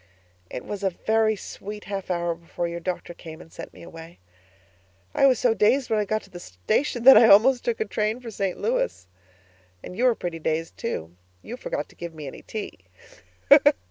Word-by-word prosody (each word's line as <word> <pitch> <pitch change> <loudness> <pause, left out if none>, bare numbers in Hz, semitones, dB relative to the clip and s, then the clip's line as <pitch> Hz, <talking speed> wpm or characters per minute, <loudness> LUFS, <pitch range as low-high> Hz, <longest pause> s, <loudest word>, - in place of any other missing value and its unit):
It - - -7
was 205 -1 -5
a 195 - +2
very 220 +4 +1
sweet 210 +1 -8
half 195 -2 -5
hour 175 -1 0
before 170 +1 -5
your 170 0 -5
doctor 175 0 -4
came 160 -1 -11
and 165 - -15
sent - - -9
me - - -14
away. 165 0 -11 1.0
I 275 - +5
was 255 -3 +4
so 240 -1 +2
dazed 235 +6 +2
when 220 - +3
I 210 - 0
got 215 +2 -1
to - - -18
the 175 - -9
station 175 - -2
that 270 +2 +10
I 230 - +7
almost 245 +5 +6
took 235 -2 -1
a 220 - 0
train 215 +2 -1
for 240 -2 -8
St 195 -3 -3
Louis. - - -1 0.8
And 180 - -8
you 245 - +1
were 245 -2 +4
pretty 175 -4 -5
dazed, 160 +1 -2
too. 85 - -5 0.3
You 240 - -7
forgot 150 -11 -4
to - - -19
give 170 -1 -8
me 155 -2 -8
any 135 - -8
tea. 215 - -7
200 Hz, 205 wpm, -25 LUFS, 170-225 Hz, 1.0 s, that